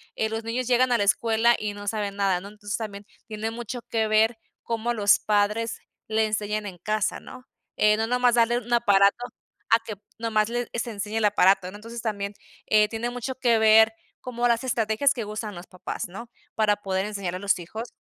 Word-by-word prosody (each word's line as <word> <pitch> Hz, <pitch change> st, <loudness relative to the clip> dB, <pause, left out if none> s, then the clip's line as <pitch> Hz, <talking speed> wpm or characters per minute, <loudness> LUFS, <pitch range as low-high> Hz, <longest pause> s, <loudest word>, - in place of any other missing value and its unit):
eh, 220 Hz, -, 0 dB
los 225 Hz, +1 st, -4 dB
niños 235 Hz, +3 st, -2 dB
llegan 250 Hz, 0 st, +3 dB
a 240 Hz, -, +4 dB
la 205 Hz, -, +1 dB
escuela 225 Hz, +3 st, +3 dB
y 210 Hz, -1 st, -3 dB
no 205 Hz, 0 st, -9 dB
saben 205 Hz, -2 st, -2 dB
nada, 195 Hz, -3 st, +1 dB
¿no?, 195 Hz, -, -9 dB
entonces, 205 Hz, -1 st, -5 dB
también 205 Hz, -2 st, -7 dB, 0.2 s
tiene 220 Hz, 0 st, -4 dB
mucho 240 Hz, +1 st, -6 dB
que 220 Hz, -1 st, +1 dB
ver 220 Hz, +2 st, +3 dB, 0.3 s
cómo 230 Hz, +1 st, -2 dB
los 205 Hz, -2 st, +4 dB
padres 210 Hz, +2 st, 0 dB, 0.3 s
le 220 Hz, 0 st, +2 dB
enseñan 215 Hz, 0 st, -2 dB
en 185 Hz, -3 st, -8 dB
casa, 215 Hz, +3 st, -1 dB
¿no?, 255 Hz, 0 st, -12 dB, 0.3 s
eh, 210 Hz, 0 st, +4 dB
no 225 Hz, 0 st, 0 dB
nomás 250 Hz, 0 st, +3 dB
darle 235 Hz, 0 st, +3 dB
un 240 Hz, 0 st, -11 dB
aparato 200 Hz, -4 st, +4 dB, 0.5 s
a 225 Hz, -, +5 dB
que 215 Hz, -2 st, -6 dB, 0.2 s
nomás 215 Hz, -2 st, +1 dB
le 240 Hz, 0 st, -3 dB
se 235 Hz, 0 st, -3 dB
enseñe 210 Hz, +1 st, -4 dB
el 220 Hz, -, +2 dB
aparato, 195 Hz, -2 st, +3 dB
¿no?, -, -, -11 dB
entonces 230 Hz, +2 st, -8 dB
también, 205 Hz, -3 st, -3 dB, 0.3 s
eh, 215 Hz, 0 st, +4 dB
tiene 225 Hz, +2 st, -3 dB
mucho 245 Hz, +2 st, -4 dB
que 240 Hz, -3 st, +2 dB
ver 220 Hz, 0 st, +6 dB, 0.3 s
como 245 Hz, -1 st, -1 dB
las 235 Hz, 0 st, +1 dB
estrategias 235 Hz, +1 st, +1 dB
que 230 Hz, -, -4 dB
usan 210 Hz, 0 st, -5 dB
los 175 Hz, +2 st, -10 dB
papás, 180 Hz, 0 st, -6 dB
¿no?, 215 Hz, +7 st, -9 dB, 0.3 s
para 210 Hz, -2 st, +2 dB
poder 190 Hz, -1 st, -2 dB
enseñar 200 Hz, -4 st, -4 dB
a -, -, -5 dB
los 200 Hz, -1 st, +1 dB
hijos. 220 Hz, +8 st, -7 dB
220 Hz, 205 wpm, -25 LUFS, 205-235 Hz, 0.5 s, ver